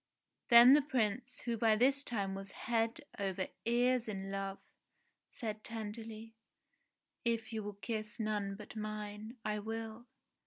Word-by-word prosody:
Then 240 +2 +10
the 295 - +7
Prince, 250 -3 -1
who 235 -1 -1
by 220 -1 +5
this 270 +5 +3
time 200 -6 -1
was 195 0 -6
head 230 +4 0 0.2
over 190 -2 -1 0.2
ears 245 +1 +3
in 195 -2 -4
love, 195 0 -3 0.7
said 215 -4 -5
tenderly, 225 0 -6 0.9
"If 230 -1 0
you 220 - -1
will 205 0 -5
kiss 215 +2 -4
none 210 -2 -1
but 210 +1 -10
mine, 215 +2 -5
I 210 0 0
will." 225 +2 -5
220 Hz, 140 wpm, -35 LUFS, 210-235 Hz, 0.9 s, Then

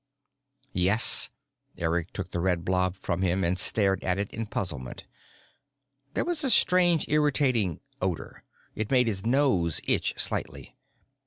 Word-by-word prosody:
"Yes." 95 +5 +5 0.5
Eric 85 0 -2
took 95 -2 -7
the 85 - -3
red 90 -1 -1
blob 90 0 0
from 95 -1 -4
him 95 +1 0
and 90 +2 0
stared 100 -1 +1
at 90 0 0
it 100 0 -3
in 115 -1 -5
puzzlement. 75 -12 -6 1.1
There - - 0
was 340 -3 0
a 270 - +3
strange, 175 - +4
irritating 135 - +1 0.2
odor: - - -4 0.3
it 110 -1 -4
made 125 -2 +3
his 100 -4 -3
nose 120 - +1
itch - - 0
slightly. - - -4
95 Hz, 140 wpm, -26 LUFS, 90-130 Hz, 1.1 s, Yes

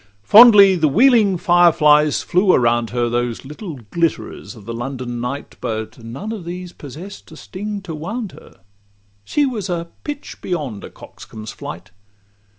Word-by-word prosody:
Fondly 205 - +8
the 160 -3 +2
wheeling 215 - +4
fire 175 0 +4
flies 150 -1 +3
flew 185 +1 +2
around 120 -1 +2
her, 120 0 -1
Those 120 +1 -2
little 155 +4 -8 0.2
glitterers 165 -5 -2
of 105 -3 -14
the 115 - -5
London 120 0 -5
night; 140 +4 -6
But 110 +1 -5
none 135 - -7
of 215 -5 -6
these 180 +1 -7
possess'd 160 +8 -11
a - - -12
sting 205 +2 -6
to 170 -4 -7
wound 195 +7 -5
her— - - -17 0.6
She 290 - 0
was 215 -8 -4
a 170 -1 -3
pitch 290 -1 -7
beyond 145 - -4
a - - -8
coxcomb's 110 -1 -11
flight. - - -9
165 Hz, 155 wpm, -19 LUFS, 120-195 Hz, 0.6 s, Fondly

